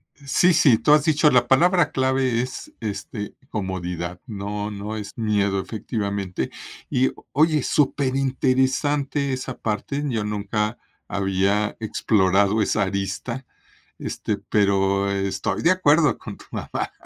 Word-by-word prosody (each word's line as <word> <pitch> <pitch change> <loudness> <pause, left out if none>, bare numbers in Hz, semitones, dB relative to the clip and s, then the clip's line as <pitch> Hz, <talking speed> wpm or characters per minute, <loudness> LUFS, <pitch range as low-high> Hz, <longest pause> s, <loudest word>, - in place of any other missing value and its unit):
Sí, 150 +5 +2
sí, 130 -7 +5
tú 150 - +3
has 150 -1 +5
dicho, 155 -1 +4
la 125 -2 +3
palabra 175 +4 +4
clave 130 -2 +1
es, 125 +1 -5
este, 105 -1 -5 0.2
"comodidad", 90 -3 -4
no 105 -1 -4
no 105 +1 -5
es 105 -2 -6
miedo, 100 -3 +1
efectivamente, 100 - -3 0.4
y, 130 +1 +2 0.2
oye, 155 0 +3
súper 140 -2 +1
interesante 135 +2 +1
esa 130 0 -4
parte, 130 +7 -2
yo 115 -5 -1
nunca 105 +1 -2 0.3
había 100 +2 0
explorado 100 -1 +2
esa 105 +1 +1
arista, 100 +6 -3 0.6
este, - - -3
pero 100 -1 +1
estoy 95 -1 -1
de 165 - +4
acuerdo 160 -4 +4
con - - -9
tu - - -15
mamá, - - -4
110 Hz, 125 wpm, -23 LUFS, 100-135 Hz, 0.6 s, sí